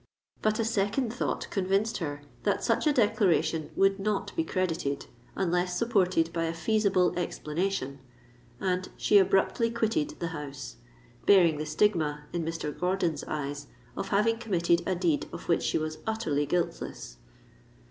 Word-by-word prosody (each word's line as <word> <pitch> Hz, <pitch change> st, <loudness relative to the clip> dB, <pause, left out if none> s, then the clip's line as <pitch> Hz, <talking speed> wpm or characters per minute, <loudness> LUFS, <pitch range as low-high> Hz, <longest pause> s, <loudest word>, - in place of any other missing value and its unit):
"—but 215 Hz, 0 st, +2 dB
a 225 Hz, -, 0 dB
second 225 Hz, +3 st, 0 dB
thought 245 Hz, -, -2 dB
convinced 200 Hz, +3 st, +1 dB
her 145 Hz, -4 st, -4 dB, 0.2 s
that 205 Hz, -, 0 dB
such 230 Hz, +5 st, +1 dB
a -, -, +5 dB
declaration 200 Hz, -, +2 dB
would 195 Hz, 0 st, +3 dB
not 200 Hz, 0 st, -2 dB
be 330 Hz, -, +1 dB
credited, 165 Hz, -, -1 dB, 0.3 s
unless 180 Hz, -1 st, 0 dB
supported 185 Hz, -8 st, +2 dB
by 165 Hz, 0 st, 0 dB
a 165 Hz, 0 st, -2 dB
feasible 190 Hz, +1 st, +2 dB
explanation; 160 Hz, -4 st, -2 dB, 0.6 s
and 185 Hz, -1 st, -1 dB
she 205 Hz, -, +5 dB
abruptly 195 Hz, +4 st, +2 dB
quitted 225 Hz, -9 st, 0 dB
the 170 Hz, -, -2 dB
house—bearing 140 Hz, -, 0 dB
the 155 Hz, -, -3 dB
stigma, 155 Hz, -5 st, +1 dB
in 170 Hz, -1 st, -1 dB
Mr. 160 Hz, -2 st, -3 dB
Gordon's 180 Hz, -4 st, 0 dB
eyes, 145 Hz, -1 st, -4 dB, 0.3 s
of 195 Hz, -, -3 dB
having 220 Hz, +3 st, +2 dB
committed 175 Hz, -6 st, +2 dB
a 190 Hz, -, +1 dB
deed 170 Hz, -4 st, 0 dB
of -, -, -8 dB
which 170 Hz, -, +2 dB
she -, -, +1 dB
was 155 Hz, 0 st, -3 dB
utterly 155 Hz, -10 st, 0 dB
guiltless! 145 Hz, -, -3 dB
180 Hz, 145 wpm, -29 LUFS, 155-205 Hz, 0.6 s, a